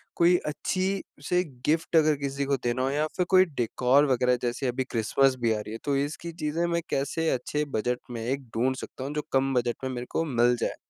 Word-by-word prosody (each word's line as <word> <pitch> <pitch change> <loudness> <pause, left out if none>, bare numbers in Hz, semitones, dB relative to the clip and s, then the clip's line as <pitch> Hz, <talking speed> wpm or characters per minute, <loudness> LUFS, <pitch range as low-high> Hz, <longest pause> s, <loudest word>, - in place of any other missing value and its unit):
कोई 175 +1 +5
अच्छी-से 180 0 -1 0.2
गिफ़्ट 160 +2 +1
अगर 155 -1 +5
किसी 140 0 -2
को 140 0 +1
देना 120 +1 0
हो 135 - +1
या 150 +2 +1
फ़िर 180 - +2
कोई 185 0 +6
डेकॉर 130 -1 +2
वग़ैरह 125 0 +3
जैसे 125 +2 -1
अभी 125 +2 -1
क्रिसमस 130 +4 +2
भी 115 -1 +2
आ 105 - -2
रही 105 - -7
है। 115 - -4
तो 140 -1 +1
इसकी 150 +4 -3
चीज़ें 155 +3 0
मैं 170 0 0
कैसे 160 +4 0
अच्छे 150 +4 -1
बजट 125 +3 0
में 115 -2 -4
एक 135 +3 -2
ढूँढ 130 +3 +2
सकता 130 - -7
हूँ 145 - -4
जो 150 - 0
कम 135 0 +2
बजट 120 -1 +1
में 130 - -2
मेरे 125 -1 -5
को - - +1
मिल 120 -4 +3
जाए? - - -1
135 Hz, 220 wpm, -27 LUFS, 125-155 Hz, 0.2 s, कोई